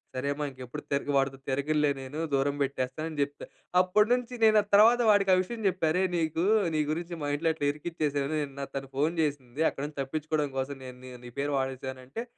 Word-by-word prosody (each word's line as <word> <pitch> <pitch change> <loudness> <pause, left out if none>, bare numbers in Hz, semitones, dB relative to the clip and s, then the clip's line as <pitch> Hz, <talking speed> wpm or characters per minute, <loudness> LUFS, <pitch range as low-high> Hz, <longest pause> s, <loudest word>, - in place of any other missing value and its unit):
"సరే 130 +2 -2
అమ్మ! 150 +1 -3
ఇంక 130 - -19
ఎప్పుడు 150 +5 -7
తిరగ 140 +1 -1
వాడితో 135 0 +1
తిరగలే 150 +2 +1
నేను. 135 +4 -6
దూరం 140 +1 +2
బెట్టేస్తా" 135 0 -2
అని 155 - -7
చెప్తా. 145 +1 -3 0.4
అప్పడి 210 +4 +3
నుంచి, 250 0 -1
నేనది 215 -2 +5
తర్వాత, 230 +4 +7
వాడికా 195 -2 +4
విషయం 230 +5 -6
జెప్పా. 185 -4 +1
"అరేయ్! 185 +2 +1
నీకు 160 +1 0 0.3
నీ 155 - +3
గురించి 170 +2 -3
మా 145 - -1
ఇంట్లో 160 +2 +1
ఇట్ల 145 - -2
ఇరికిచ్చేసాను. 150 -2 -2
నిన్న 140 -1 -6
తను 135 -1 -4
ఫోన్ 155 +5 +1
జేసింది. 140 -1 -1
అక్కడి 140 - -5
నుంచి 150 -2 -10
తప్పించుకోడం 150 +2 -1
కోసం, 140 +2 -3
నేను 125 0 -9
నీ 130 - -9 0.2
నీ 120 - -9
పేరు 145 +1 0
వాడేసానంటే" 130 - -4
145 Hz, 195 wpm, -29 LUFS, 135-170 Hz, 0.4 s, తర్వాత